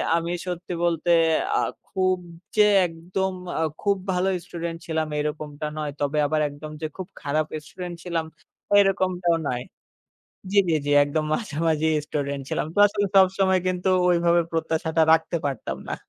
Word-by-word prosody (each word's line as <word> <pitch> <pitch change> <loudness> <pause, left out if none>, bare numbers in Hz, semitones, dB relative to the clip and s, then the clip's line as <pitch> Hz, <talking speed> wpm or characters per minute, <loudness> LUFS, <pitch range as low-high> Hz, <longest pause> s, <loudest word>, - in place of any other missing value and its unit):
আমি 170 0 -1
সত্যি 180 0 -4
বলতে 170 0 +1 0.5
আ - - +3 0.4
খুব 185 0 +3 0.4
যে 210 -1 +6 0.2
একদম 180 +3 -3 0.3
আ - - +1 0.2
খুব 200 -1 +2 0.2
ভালো 180 +1 +1 0.2
স্টুডেন্ট 170 -1 -5
ছিলাম 160 -1 -1
এরকমটা 150 0 -4
নয়, 150 -1 -2
তবে 145 +1 0
আবার 155 +1 +1
একদম 145 +2 -9
যে - - -2
খুব 185 -2 -5
খারাপ 155 +2 0 0.2
স্টুডেন্ট 180 +2 -7
ছিলাম 170 -2 -2 0.5
এরকমটাও 185 -3 +2
নয়। 125 0 -2 0.9
জী, 200 - +4
জী, 165 - +3
জী 145 - -1
একদম 155 +2 -1
মাঝামাঝি 160 -6 0 0.2
স্টুডেন্ট 140 -1 -3
ছিলাম, - - -1
ক্লাসে 205 0 +4 0.2
সবসময় 190 0 +4
কিন্তু 185 0 0 0.2
ঐভাবে 170 0 +3
প্রত্যাশাটা 160 0 0
রাখতে 165 +1 +2
পারতাম 110 - -3
না। - - -1
165 Hz, 145 wpm, -24 LUFS, 155-185 Hz, 0.9 s, যে